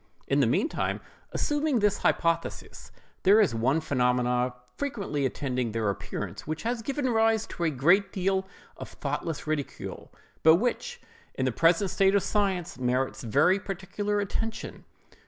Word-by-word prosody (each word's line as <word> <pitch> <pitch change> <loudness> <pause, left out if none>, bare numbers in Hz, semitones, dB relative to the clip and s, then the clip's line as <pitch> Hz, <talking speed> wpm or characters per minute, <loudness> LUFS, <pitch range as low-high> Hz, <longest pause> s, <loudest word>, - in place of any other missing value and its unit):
In - - +2
the - - +4
meantime, - - 0 0.3
assuming 295 -2 0
this 205 -2 +2
hypothesis, 165 0 -1 0.3
there 200 +3 +6
is 200 - +3
one 125 +7 +2
phenomenon 125 -3 +1 0.2
frequently 200 - -2
attending 125 -3 -2
their 110 -3 +1
appearance, 100 0 -6
which 155 0 -3
has 235 0 -1
given 275 +3 -2
rise 225 -1 +3
to 170 - -4
a - - +3
great 175 +8 +3
deal 190 0 0 0.3
of - - -8
thoughtless 165 -3 -4
ridicule, 155 -2 -4 0.3
but 160 0 +7
which, 365 - -2 0.3
in 130 - -1
the 130 - +1
present 170 - +3
state 195 0 +3
of 200 - +3
science, 190 - -1
merits 125 +1 0
very 180 - +3
particular 205 +1 -3
attention. 220 +3 -4
180 Hz, 145 wpm, -27 LUFS, 130-205 Hz, 0.3 s, but